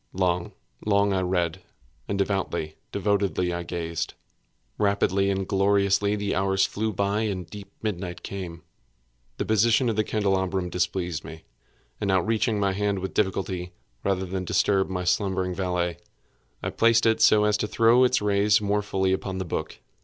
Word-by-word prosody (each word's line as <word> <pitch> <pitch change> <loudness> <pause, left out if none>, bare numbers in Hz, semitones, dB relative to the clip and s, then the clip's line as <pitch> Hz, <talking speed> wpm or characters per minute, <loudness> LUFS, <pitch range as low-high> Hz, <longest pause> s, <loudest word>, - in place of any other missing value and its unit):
Long, 90 -2 0 0.3
long 100 -1 +2
I 95 - +1
read—and 90 -3 -4
devoutly, 95 -5 -1 0.2
devotedly 100 -3 0
I 85 - -3
gazed. 85 -2 -4 0.6
Rapidly 100 -1 +2
and 95 -1 -1
gloriously 100 +1 +2
the 100 -1 -2
hours 95 +1 +2
flew 110 +3 -2
by 100 +2 0
and 100 -5 -2
the - - -27
deep 100 -1 -9
midnight 90 -4 -4
came. 90 -4 -6 0.7
The - - -2
position 115 +3 +3
of 110 - -1
the 110 - +2
candelabrum 95 -4 0
displeased 90 -2 -1
me, 80 0 -10 0.6
and 100 - -1
outreaching 110 +3 +1
my 100 -1 +1
hand 100 0 0
with 95 0 -4
difficulty, 95 -3 -1 0.3
rather 95 -1 0
than 95 0 -3
disturb 95 +1 +2
my 90 -1 -2
slumbering 95 0 0
valet, 90 -2 -1 0.7
I - - -2
placed 115 0 +3
it 110 0 +3
so 105 -1 +6
as 105 0 +3
to 105 - -1
throw 115 +4 +4
its 125 -3 +2
rays 105 0 +3
more 105 0 0
fully 95 -2 0
upon 95 0 -3
the 95 - -3
book. 85 - -4
95 Hz, 160 wpm, -25 LUFS, 90-105 Hz, 0.7 s, so